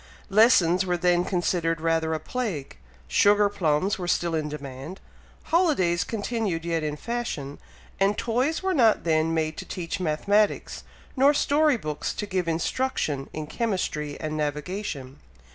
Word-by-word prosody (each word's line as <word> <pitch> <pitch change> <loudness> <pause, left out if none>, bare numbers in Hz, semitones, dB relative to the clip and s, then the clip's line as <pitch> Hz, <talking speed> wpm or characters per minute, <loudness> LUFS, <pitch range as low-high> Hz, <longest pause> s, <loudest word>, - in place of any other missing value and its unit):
Lessons 195 -5 +5
were 180 -1 0
then 175 0 +2
considered 175 -2 0
rather 160 0 +1
a - - -3
plague, 180 - -4 0.3
sugar 205 - +4
plums 185 0 0
were 180 - -4
still 175 -1 +1
in 155 -2 -1
demand 140 +4 -7 0.4
holidays 285 - +2
continued 210 -6 -2
yet 165 -1 0
in 150 -1 -2
fashion 155 -9 -4 0.4
and 195 +1 +2
toys 255 +9 0
were 380 0 +1
not 230 -9 +4
then 160 -1 +2
made 160 -1 -1
to - - -6
teach 180 +2 -4
mathematics, 200 +6 +1 0.3
nor 280 +2 +5
story 295 -1 +3
books 150 -7 -4
to 210 - -3
give 185 -3 -2
instruction 165 - -1
in 155 -1 -5
chemistry 155 -7 -2
and 155 -1 -3
navigation. 150 -2 -4
175 Hz, 145 wpm, -25 LUFS, 155-210 Hz, 0.4 s, Lessons